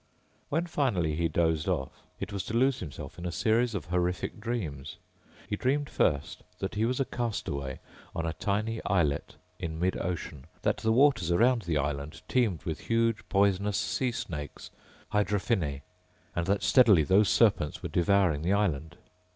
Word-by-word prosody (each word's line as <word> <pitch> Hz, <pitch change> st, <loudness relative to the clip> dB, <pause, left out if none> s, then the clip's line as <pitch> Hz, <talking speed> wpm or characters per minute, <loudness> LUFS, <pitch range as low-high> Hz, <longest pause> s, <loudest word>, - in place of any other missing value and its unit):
When 165 Hz, +4 st, 0 dB
finally 110 Hz, -, 0 dB
he 85 Hz, +2 st, +1 dB
dozed 80 Hz, -1 st, +1 dB
off 65 Hz, -, -2 dB, 0.2 s
it 100 Hz, -, -5 dB
was 100 Hz, -, -2 dB
to 110 Hz, -, -4 dB
lose 130 Hz, +2 st, +3 dB
himself 75 Hz, 0 st, -8 dB
in 85 Hz, -, -6 dB
a -, -, -3 dB
series 115 Hz, +4 st, +1 dB
of 85 Hz, -6 st, -3 dB
horrific 90 Hz, +2 st, -1 dB
dreams. 80 Hz, -, -4 dB, 0.5 s
He -, -, -1 dB
dreamed 140 Hz, +6 st, 0 dB
first 70 Hz, -4 st, 0 dB, 0.2 s
that 95 Hz, -, -4 dB
he 110 Hz, +2 st, +1 dB
was 125 Hz, +3 st, 0 dB
a 135 Hz, -, +2 dB
castaway 70 Hz, -, -3 dB, 0.4 s
on 85 Hz, -, -2 dB
a 80 Hz, -, -1 dB
tiny 105 Hz, +6 st, -1 dB
islet 75 Hz, -7 st, 0 dB, 0.2 s
in 80 Hz, -1 st, -4 dB
mid 90 Hz, +2 st, +1 dB
ocean, 85 Hz, -6 st, -4 dB, 0.2 s
that -, -, +2 dB
the 110 Hz, -, 0 dB
waters 130 Hz, -, +4 dB
around 115 Hz, +7 st, +4 dB
the 85 Hz, -5 st, -1 dB
island 70 Hz, +1 st, -3 dB
teemed 115 Hz, -10 st, +1 dB
with 80 Hz, -4 st, -3 dB
huge 115 Hz, -1 st, +1 dB
poisonous 100 Hz, 0 st, +2 dB
sea 130 Hz, -2 st, 0 dB
snakes... 75 Hz, -10 st, -6 dB, 0.4 s
hydrophinnae... 100 Hz, -, 0 dB, 0.5 s
and 85 Hz, 0 st, -1 dB
that 100 Hz, +1 st, +1 dB
steadily 110 Hz, -, +6 dB
those 95 Hz, +7 st, +4 dB
serpents 100 Hz, -10 st, +2 dB
were -, -, -3 dB
devouring 90 Hz, -4 st, +2 dB
the 90 Hz, +5 st, +1 dB
island. 85 Hz, -6 st, 0 dB
95 Hz, 165 wpm, -29 LUFS, 80-115 Hz, 0.5 s, steadily